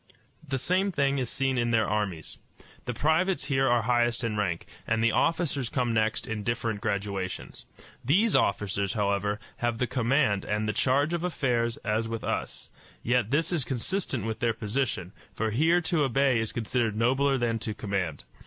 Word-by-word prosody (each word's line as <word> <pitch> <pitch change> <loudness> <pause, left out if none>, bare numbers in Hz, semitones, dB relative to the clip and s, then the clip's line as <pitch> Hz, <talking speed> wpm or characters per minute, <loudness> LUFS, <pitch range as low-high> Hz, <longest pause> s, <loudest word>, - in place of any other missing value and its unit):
The 135 -1 -1
same 185 +9 +1
thing 140 -4 +1
is 125 -2 -2
seen 135 -1 0
in 120 0 +1
their 110 -3 +2
armies. 100 -7 -3 0.5
The 125 - -2
privates 160 +3 +1
here 135 -1 +2
are 120 -2 +3
highest 120 0 +1
in 115 -2 -1
rank, 95 -5 -1 0.2
and 115 -1 +1
the 115 - +4
officers 145 -6 +1
come 125 -3 0
next 110 0 +1
in 110 -1 -3
different 115 -1 -2
graduations. 100 -2 -3 0.4
These 190 - +3
officers, 100 0 +1
however, 105 0 0 0.2
have 120 -1 -1
the 125 - +1
command 125 -3 +1
and 105 +1 -1
the 110 - 0
charge 140 +7 +2
of 170 0 -1
affairs 120 -9 0
as 110 +2 0
with 115 0 -4
us; - - -4 0.3
yet 120 -2 +1
this 160 +6 +1
is 160 -6 0
consistent 130 - -2
with 110 0 -3
their 115 -1 +1
position, 105 -5 -2 0.2
for 110 -1 -1
here 165 +9 +3
to 165 -1 0
obey 135 -2 +3
is 110 -1 -1
considered 115 -1 -1
nobler 135 +5 +2
than 115 -2 0
to 110 -1 -4
command. 95 -7 -3
120 Hz, 175 wpm, -28 LUFS, 105-135 Hz, 0.5 s, the